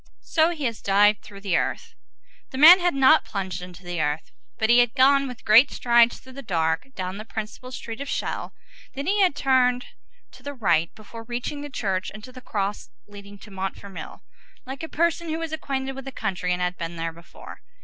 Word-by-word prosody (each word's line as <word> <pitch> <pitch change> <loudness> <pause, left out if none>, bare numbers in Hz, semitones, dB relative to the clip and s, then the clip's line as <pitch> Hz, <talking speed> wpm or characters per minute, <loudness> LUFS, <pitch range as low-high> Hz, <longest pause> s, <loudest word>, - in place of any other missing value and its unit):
So 320 0 +2
he 330 -4 -5
has 230 -3 -2
dived 205 +1 +3
through 200 -1 -13
the 195 -2 +1
earth." 460 -1 -3 0.6
The 260 - -7
man 330 +6 +10
had 355 -3 +1
not 275 +3 +5
plunged 190 -3 -5
into 180 0 -11
the 175 -2 -3
earth, 150 +1 -2 0.3
but 220 0 +2
he 240 - +7
had 240 0 +2
gone 275 +1 +4
with 250 -2 -10
great 225 +6 +7
strides 235 -1 +3
through 260 0 -15
the 275 - -8
dark, 165 -1 -1
down 185 +1 -4
the - - -6
principal 220 +3 -7
street 235 0 -7
of 280 - -5
Chelles, - - -3 0.4
then 275 +1 -4
he 405 +3 +2
had 365 -7 +3
turned 255 -3 +2 0.5
to 255 - -16
the 285 +2 -7
right 170 -8 +2
before 220 +1 -11
reaching 245 +5 -4
the 290 - -7
church, 195 -8 -2
into 215 +5 -11
the 255 0 -12
crossroad 205 -4 -4
leading 205 0 -12
to 205 +1 -14
Montfermeil, 195 0 -7 0.4
like 265 +1 -7
a 320 - -6
person 340 +1 0
who 315 - -2
was 330 -1 -4
acquainted 270 -4 -3
with 270 0 -8
the 270 - -6
country 190 -6 -3
and 180 0 0
had 180 0 -3
been 170 0 -5
there 165 0 -4
before. 170 +1 -13
235 Hz, 210 wpm, -24 LUFS, 195-275 Hz, 0.6 s, man